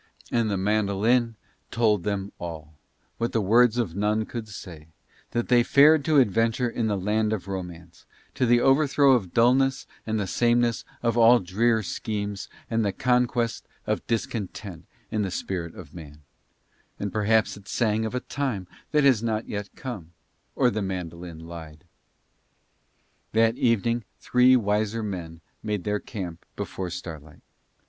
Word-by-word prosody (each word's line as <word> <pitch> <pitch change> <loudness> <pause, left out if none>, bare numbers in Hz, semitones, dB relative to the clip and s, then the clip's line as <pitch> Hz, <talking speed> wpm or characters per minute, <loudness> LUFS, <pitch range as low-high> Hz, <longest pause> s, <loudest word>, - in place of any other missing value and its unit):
And 115 -2 +1
the 100 - 0
mandolin 110 +4 +1 0.3
told 110 -4 +2
them 100 +1 -3
all, 80 -3 -7 0.5
what 115 +1 -1
the 115 - +2
words 115 +3 +4
of 105 -9 -1
none 105 +2 +1
could 115 -1 -6
say, 85 -7 -10 0.4
that 120 0 -2
they 120 -1 +5
fared 145 +4 +5
to 155 -2 +3
adventure 115 0 +3
in 115 -1 -1
the 105 -2 0
land 105 +3 0
of 105 -3 -3
Romance, 90 -3 -7 0.3
to 125 - +1
the 120 0 +4
overthrow 140 +1 +4
of 105 -9 +2
dullness 130 +3 +3 0.2
and 110 0 0
the 100 - -1
sameness 120 +3 +1 0.2
of 115 0 +1
all 115 +2 +7
drear 110 +4 +1
schemes 100 0 -4 0.2
and 115 -1 0
the 100 - +1
conquest 125 -1 0 0.2
of - - -2
discontent 105 -4 -4 0.2
in 110 - 0
the 100 - -1
spirit 85 -2 -4
of 75 -5 -11
man; 75 -3 -11 0.8
and 100 -2 -3
perhaps 110 +1 +2
it 100 0 -15
sang 110 -2 0
of 110 +2 -3
a 125 - -1
time 125 -10 -3 0.3
that 150 -1 +4
has 130 -6 +5
not 110 -1 -2
yet 100 -1 -4
come, 100 -11 -7 0.4
or 125 - +3
the 110 - -2
mandolin 90 -3 -5
lied. 80 -1 -10 1.5
That 115 +1 +3
evening 115 -1 +1
three 125 +1 +5
wiser 110 0 0
men 85 -5 -6 0.2
made 105 -4 -3
their 105 0 -1
camp 90 -8 -7
before 95 -2 -4
starlight. 80 -3 -9
110 Hz, 155 wpm, -25 LUFS, 95-120 Hz, 1.5 s, all